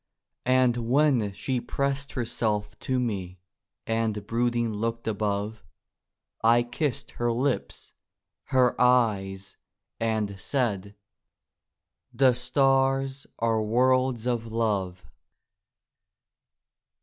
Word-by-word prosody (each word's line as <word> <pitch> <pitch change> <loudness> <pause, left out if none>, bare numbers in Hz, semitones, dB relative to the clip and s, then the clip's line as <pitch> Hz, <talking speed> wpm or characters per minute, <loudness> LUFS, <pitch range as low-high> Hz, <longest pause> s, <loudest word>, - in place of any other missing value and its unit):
And 125 -1 +4
when 120 -2 +2
she 120 +6 -2
pressed 140 +1 -2
herself 110 -4 -1
to 130 -1 -1
me 95 -7 -3 0.5
And 110 -2 -1
brooding 120 0 0
looked 115 +2 -3
above, 105 0 -2 0.8
I 120 +1 +5
kissed 125 +2 -3
her 120 0 -1
lips, 130 +3 -2 0.5
her 130 -2 +3
eyes, 100 -6 +2 0.4
and 110 -3 -1
said: 105 -5 -1 1.2
"The 130 -2 +4
stars 135 +1 +1
are 115 -1 +1
worlds 125 +2 +2
of 120 -2 -1
love." 100 -6 -1
115 Hz, 90 wpm, -27 LUFS, 105-130 Hz, 1.2 s, I